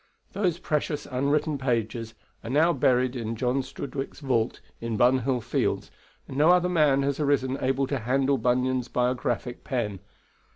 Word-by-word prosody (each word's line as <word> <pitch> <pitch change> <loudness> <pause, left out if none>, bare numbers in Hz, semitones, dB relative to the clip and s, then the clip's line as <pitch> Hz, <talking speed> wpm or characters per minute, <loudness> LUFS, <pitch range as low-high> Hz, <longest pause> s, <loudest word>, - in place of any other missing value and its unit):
Those 180 -5 0
precious 150 -3 -2
unwritten 140 +3 0
pages 115 -3 -2 0.3
are 115 - -6
now 160 +6 +4
buried 125 -1 +2
in 115 -2 -3
John 125 +4 0
Strudwick's 135 +1 -6
vault 125 -5 0 0.2
in 115 -2 -3
Bunhill 125 +1 +3
Fields, - - -1 0.4
and 130 - -7
no 150 +3 +5
other 180 0 +5
man 150 -6 +3
has 140 +1 -1
arisen 140 -3 +1
able 135 +1 +1
to 135 0 -2
handle 135 +3 +1
Bunyan's 125 +1 +1
biographic 125 0 -1
pen. 105 -7 -2
130 Hz, 150 wpm, -26 LUFS, 125-140 Hz, 0.4 s, no